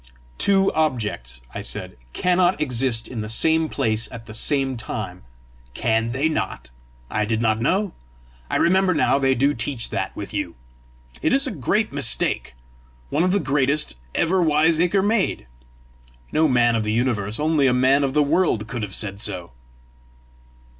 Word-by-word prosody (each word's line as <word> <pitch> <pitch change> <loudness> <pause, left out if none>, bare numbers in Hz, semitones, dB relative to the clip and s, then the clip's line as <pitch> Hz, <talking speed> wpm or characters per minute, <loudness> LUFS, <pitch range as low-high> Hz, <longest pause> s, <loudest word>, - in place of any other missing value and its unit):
"Two 195 -1 +3
objects," 105 - -2
I - - -5
said, - - -5 0.2
"cannot 180 - +2
exist 125 -4 0
in 115 -4 -5
the 105 - -5
same 160 +7 +2
place 115 -4 -1
at 115 -1 -9
the 110 - -10
same 135 +2 0
time!" 110 -5 -6 0.5
"Can 115 +1 0
they 130 +6 0
not? 95 - -3 0.4
I 105 - 0
did 110 +1 -1
not 110 -1 +1
know! 190 - 0 0.6
I - - -2
remember 185 0 +3
now 140 -2 +2
they 135 -1 +2
do 140 +4 +2
teach 120 0 -2
that - - -3
with - - -7
you. - - -3 0.7
It - - +1
is 275 +1 +3
a 265 - -2
great 205 - -1
mistake 125 - 0 0.6
one 150 - +1
of 185 - +2
the 200 - +2
greatest 145 0 0 0.2
ever 180 +2 +2
wiseacre 165 +4 +3
made! 205 - 0 0.9
No 160 +1 +3
man 120 -3 +3
of 115 - +1
the 105 - -1
universe, 110 -3 0
only 150 -2 +2
a - - +4
man 130 +3 +3
of 135 0 -1
the 150 - +5
world 145 - +1
could 120 -1 -5
have 100 -3 -2
said 100 -1 0
so!" 90 - -3
135 Hz, 165 wpm, -22 LUFS, 115-160 Hz, 0.9 s, the